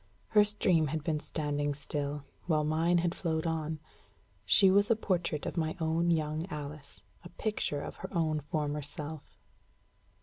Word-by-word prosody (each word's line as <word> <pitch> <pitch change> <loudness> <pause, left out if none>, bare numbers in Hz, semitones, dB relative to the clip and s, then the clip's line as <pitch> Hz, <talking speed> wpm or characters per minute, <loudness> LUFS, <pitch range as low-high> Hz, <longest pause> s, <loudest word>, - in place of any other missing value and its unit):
Her 210 -1 +6
stream 185 -6 +2
had 155 +1 -2
been 155 -2 0
standing 145 -2 -2
still, 145 0 -3 0.2
while 155 -3 +3
mine 165 +3 +2
had 170 0 +1
flowed 160 -3 -1
on. 160 -1 -1 0.7
She 190 - +6
was 200 +3 +4
a 230 - +5
portrait 175 -8 -1
of - - -4
my 160 +1 0
own 165 +1 +1
young 155 0 0
Alice, 145 - -7 0.2
a - - -9
picture 170 -6 -2
of - - -7
her - - -6
own 160 -4 +1
former 150 0 -2
self. 150 +1 -7
155 Hz, 160 wpm, -31 LUFS, 150-170 Hz, 0.7 s, Her